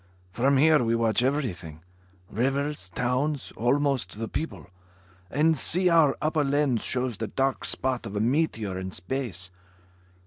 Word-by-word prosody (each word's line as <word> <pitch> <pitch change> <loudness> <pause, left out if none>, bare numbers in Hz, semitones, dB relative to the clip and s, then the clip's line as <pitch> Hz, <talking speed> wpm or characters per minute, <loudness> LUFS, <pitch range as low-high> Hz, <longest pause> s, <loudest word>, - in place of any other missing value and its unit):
From 135 +7 +2
here 150 -1 +5
we 115 0 +1
watch 115 -1 +2
everything; 95 - -2 0.4
rivers, 135 +1 -2
towns, 130 - -1
almost 135 0 0
the 115 0 -3
people. 160 - -5 0.6
And 155 - +2
see, 180 +5 +2
our 165 -5 +4
upper 155 0 +1
lens 140 -4 +1
shows 125 -3 -1
the 110 - -3
dark 135 +2 -1
spot 130 -3 -1
of 100 - -7
a - - 0
meteor 115 - 0
in 95 0 -5
space. 95 -1 -4
130 Hz, 140 wpm, -26 LUFS, 110-145 Hz, 0.6 s, here